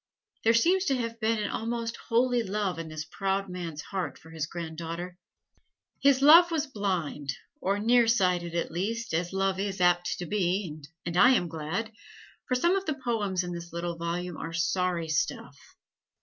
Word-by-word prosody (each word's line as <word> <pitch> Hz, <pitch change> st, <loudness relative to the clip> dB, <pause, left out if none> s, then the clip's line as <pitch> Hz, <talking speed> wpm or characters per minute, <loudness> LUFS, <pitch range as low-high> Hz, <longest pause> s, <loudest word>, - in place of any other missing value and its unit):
There 225 Hz, +1 st, +5 dB
seems 365 Hz, +11 st, +3 dB
to 270 Hz, -, +2 dB
have 230 Hz, -1 st, -4 dB
been 225 Hz, 0 st, +1 dB
an 210 Hz, -1 st, -2 dB
almost 230 Hz, 0 st, -3 dB
holy 245 Hz, +1 st, +1 dB
love 200 Hz, -4 st, -2 dB
in 165 Hz, -, -5 dB
this 155 Hz, -1 st, -5 dB
proud 195 Hz, +3 st, -2 dB
man's 170 Hz, -4 st, -5 dB
heart 180 Hz, -8 st, -4 dB
for 160 Hz, -, -16 dB
his 160 Hz, -2 st, -3 dB
granddaughter. 170 Hz, +1 st, -6 dB, 0.9 s
His 275 Hz, -1 st, +4 dB
love 335 Hz, +4 st, +9 dB
was 320 Hz, -3 st, 0 dB
blind, 180 Hz, -, -2 dB, 0.3 s
or 195 Hz, +2 st, +1 dB
near 235 Hz, +3 st, +4 dB
sighted 180 Hz, -6 st, +2 dB
at 170 Hz, -, -1 dB
least, 225 Hz, +6 st, -3 dB
as 170 Hz, +2 st, 0 dB
love 195 Hz, 0 st, 0 dB
is 195 Hz, -1 st, -2 dB
apt 175 Hz, 0 st, +2 dB
to 175 Hz, -, -4 dB
be 180 Hz, -4 st, -1 dB, 0.2 s
(and 170 Hz, -1 st, -3 dB
I 245 Hz, +8 st, +7 dB
am 180 Hz, -, +1 dB
glad!), 165 Hz, +8 st, -3 dB, 0.6 s
for 255 Hz, -, +1 dB
some 345 Hz, +9 st, +3 dB
of 390 Hz, -2 st, -2 dB
the 310 Hz, -, 0 dB
poems 210 Hz, -8 st, -1 dB
in 175 Hz, -, -5 dB
this 170 Hz, 0 st, -7 dB
little 170 Hz, 0 st, -3 dB
volume 170 Hz, +1 st, -3 dB
are 165 Hz, -, -6 dB
sorry 180 Hz, 0 st, 0 dB
stuff. 140 Hz, -2 st, -1 dB
190 Hz, 180 wpm, -28 LUFS, 170-230 Hz, 0.9 s, love